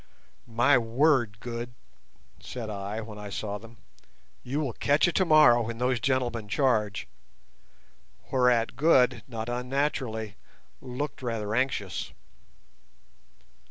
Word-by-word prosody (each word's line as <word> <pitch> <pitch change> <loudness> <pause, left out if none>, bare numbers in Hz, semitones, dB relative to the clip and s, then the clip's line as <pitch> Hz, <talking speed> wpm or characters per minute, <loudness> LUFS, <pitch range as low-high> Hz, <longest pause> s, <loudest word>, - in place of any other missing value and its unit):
"My 120 +3 +4
word, 120 -2 +2
Good," 120 0 -6 0.6
said 115 -4 -6
I, 100 +2 -4
when 110 -1 -9
I 105 0 -7
saw 105 0 -4
them, 115 +2 -14 0.6
"you 135 +4 -3
will 140 -6 -2
catch 145 +8 +2
it 175 - -1
tomorrow 155 -9 +6
when 115 0 -4
those 125 0 +1
gentlemen 120 -3 -1
charge!" 110 -6 +1 1.2
whereat 125 -3 +2
Good 130 -6 +4
not 115 -3 -5
unnaturally 125 -3 -2 0.4
looked 135 +3 -5
rather 110 -4 -3
anxious. 130 +3 -1
120 Hz, 110 wpm, -27 LUFS, 110-130 Hz, 1.2 s, tomorrow